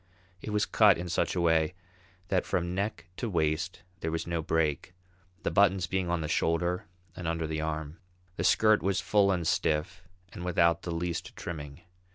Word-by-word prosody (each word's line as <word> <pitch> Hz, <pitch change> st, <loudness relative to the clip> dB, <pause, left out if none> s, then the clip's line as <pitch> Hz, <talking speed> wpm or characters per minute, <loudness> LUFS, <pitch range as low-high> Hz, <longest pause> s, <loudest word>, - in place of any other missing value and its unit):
It -, -, -6 dB
was 105 Hz, 0 st, +1 dB
cut 105 Hz, -4 st, +5 dB
in 90 Hz, +1 st, -5 dB
such 85 Hz, -, 0 dB
a 90 Hz, -, +1 dB
way 80 Hz, +1 st, +2 dB, 0.5 s
that -, -, +2 dB
from 85 Hz, 0 st, -1 dB
neck 100 Hz, -2 st, -2 dB
to 120 Hz, -, -2 dB
waist 85 Hz, +1 st, -1 dB, 0.2 s
there 80 Hz, -, -2 dB
was 80 Hz, 0 st, -2 dB
no 85 Hz, -1 st, -1 dB
break, 80 Hz, +2 st, -1 dB, 0.5 s
the -, -, 0 dB
buttons 95 Hz, -2 st, +4 dB
being 95 Hz, 0 st, -1 dB
on 85 Hz, -1 st, 0 dB
the 75 Hz, -, -2 dB
shoulder 85 Hz, +2 st, 0 dB, 0.3 s
and 90 Hz, -, -5 dB
under 80 Hz, 0 st, -1 dB
the 80 Hz, 0 st, -2 dB
arm. 80 Hz, +1 st, -4 dB, 0.4 s
The -, -, -3 dB
skirt 110 Hz, -1 st, +4 dB
was 95 Hz, -1 st, +1 dB
full 100 Hz, -2 st, +3 dB
and 90 Hz, -3 st, -1 dB
stiff, 80 Hz, +2 st, 0 dB, 0.3 s
and 85 Hz, -, -7 dB
without 85 Hz, -1 st, +3 dB
the 85 Hz, -, -5 dB
least 85 Hz, 0 st, -3 dB
trimming. 75 Hz, -4 st, -7 dB
85 Hz, 185 wpm, -29 LUFS, 80-90 Hz, 0.5 s, cut